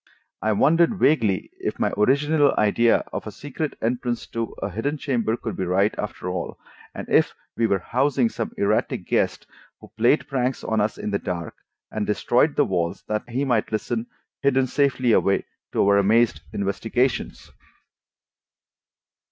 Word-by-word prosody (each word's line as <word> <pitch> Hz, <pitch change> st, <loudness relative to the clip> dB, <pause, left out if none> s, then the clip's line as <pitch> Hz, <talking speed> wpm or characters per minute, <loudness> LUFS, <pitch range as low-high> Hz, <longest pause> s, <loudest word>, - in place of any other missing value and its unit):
I 110 Hz, -, +1 dB
wondered 165 Hz, -, +3 dB
vaguely 115 Hz, -, +2 dB
if -, -, -3 dB
my -, -, 0 dB
original 145 Hz, +6 st, +3 dB
idea 115 Hz, +2 st, +3 dB
of -, -, -4 dB
a -, -, -5 dB
secret 145 Hz, +5 st, -5 dB
entrance 120 Hz, 0 st, -1 dB
to 115 Hz, -1 st, -3 dB
a 100 Hz, -, -3 dB
hidden 140 Hz, +10 st, -2 dB
chamber 120 Hz, -6 st, -1 dB
could 115 Hz, -, -5 dB
be -, -, -2 dB
right, 95 Hz, +4 st, +2 dB
after 105 Hz, -3 st, -5 dB
all, 90 Hz, -, -4 dB, 0.4 s
and -, -, -6 dB
if -, -, +3 dB, 0.2 s
we 115 Hz, -, +2 dB
were 100 Hz, -, +2 dB
housing 130 Hz, +6 st, +1 dB
some -, -, -4 dB
erratic -, -, 0 dB
guest, -, -, 0 dB, 0.3 s
who 110 Hz, -2 st, -15 dB
played 120 Hz, +7 st, +3 dB
pranks 130 Hz, -1 st, -1 dB
on 110 Hz, -1 st, 0 dB
us 105 Hz, +1 st, -1 dB
in 105 Hz, -, -4 dB
the 100 Hz, -, 0 dB
dark, 85 Hz, -2 st, -4 dB, 0.4 s
and 105 Hz, -1 st, -2 dB
destroyed 120 Hz, +7 st, +2 dB
the 145 Hz, -, +3 dB
walls 85 Hz, -4 st, -2 dB
that 105 Hz, +2 st, -3 dB
he 130 Hz, +4 st, -1 dB
might 120 Hz, -5 st, 0 dB
listen, 115 Hz, +2 st, -2 dB, 0.3 s
hidden 135 Hz, -1 st, +3 dB
safely 130 Hz, -2 st, +1 dB
away, 100 Hz, -2 st, +2 dB, 0.3 s
to -, -, +2 dB
our 100 Hz, 0 st, +5 dB
amazed 105 Hz, -5 st, +3 dB
investigations. 110 Hz, +6 st, -1 dB
115 Hz, 160 wpm, -23 LUFS, 105-135 Hz, 0.4 s, our